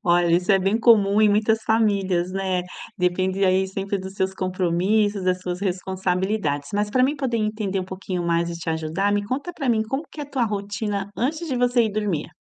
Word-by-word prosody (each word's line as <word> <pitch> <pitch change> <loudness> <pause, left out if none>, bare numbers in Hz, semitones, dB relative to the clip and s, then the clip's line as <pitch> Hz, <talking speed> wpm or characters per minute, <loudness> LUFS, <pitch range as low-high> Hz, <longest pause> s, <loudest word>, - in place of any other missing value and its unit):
Olha, 175 -1 +3
isso 180 +3 +2
é 195 - +5
bem 195 +4 +1
comum 210 -3 +5
em 215 - +6
muitas 220 +2 +2
famílias, 195 -5 +1
né, 190 -1 -1 0.4
depende 185 +2 +1
aí 190 +1 +3
sempre 195 +1 -3
dos 190 +1 -8
seus 190 -1 -1
compromissos, 190 +2 0
das 185 0 +1
suas 180 0 -4
responsabilidades. 185 -4 -1
Mas 205 0 0
para 255 +3 +2
mim 285 +3 +2
poder 260 -4 -1
entender 215 -3 -1
um - - -4
pouquinho 185 -1 -4
mais 170 0 +1
e - - -4
te 165 0 -3
ajudar, 160 +6 -1
me 205 0 0
conta 280 - -3
para 280 -6 -4
mim, 225 -2 +3
como 270 +8 -3
que 305 - -9
é - - -3
a 285 - -18
tua 255 -3 +1
rotina 205 -1 -3
antes 310 +7 -1
de 260 - -1
você 245 0 +3
ir 215 - -2
dormir? 205 -8 -2
195 Hz, 215 wpm, -23 LUFS, 185-220 Hz, 0.4 s, em